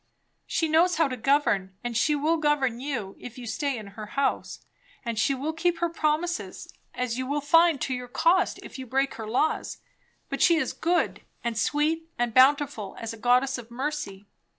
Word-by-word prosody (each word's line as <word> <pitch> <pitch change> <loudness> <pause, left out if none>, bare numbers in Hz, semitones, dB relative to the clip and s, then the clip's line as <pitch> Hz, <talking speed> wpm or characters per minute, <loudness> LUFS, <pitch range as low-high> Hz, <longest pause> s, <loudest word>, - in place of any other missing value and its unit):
She 325 - 0
knows 330 +3 +4
how 320 -2 +3
to 255 - -3
govern, 220 -7 +1
and 240 -1 -3
she 295 +7 +3
will 310 +3 +1
govern 290 -6 +1
you, 245 -8 -4
if 245 0 -9
you 250 - -8
stay 275 +3 -2
in 215 - -7
her 215 0 -8
house; 275 +5 -2 0.4
and 230 -2 -2
she 275 +5 +2
will 290 +5 -3
keep 340 +1 0
her 340 0 0
promises, 330 +2 -2 0.2
as 250 -1 -2
you 260 - -3
will 285 +2 0
find 330 +1 +4
to 260 - -1
your 250 0 -5
cost 335 +9 +2
if - - -10
you 260 - -7
break 270 +3 0
her 220 -1 -7
laws; 255 +8 0 0.5
but - - -4
she 340 - +6
is 320 - 0
good, 345 +2 0 0.2
and 235 -1 -2
sweet, 305 +8 0
and 240 -1 0
bountiful, 260 -5 +3
as 230 0 -5
a - - -7
goddess 250 +3 +2
of 235 -1 -11
mercy. 250 -6 -4
270 Hz, 195 wpm, -26 LUFS, 235-310 Hz, 0.5 s, she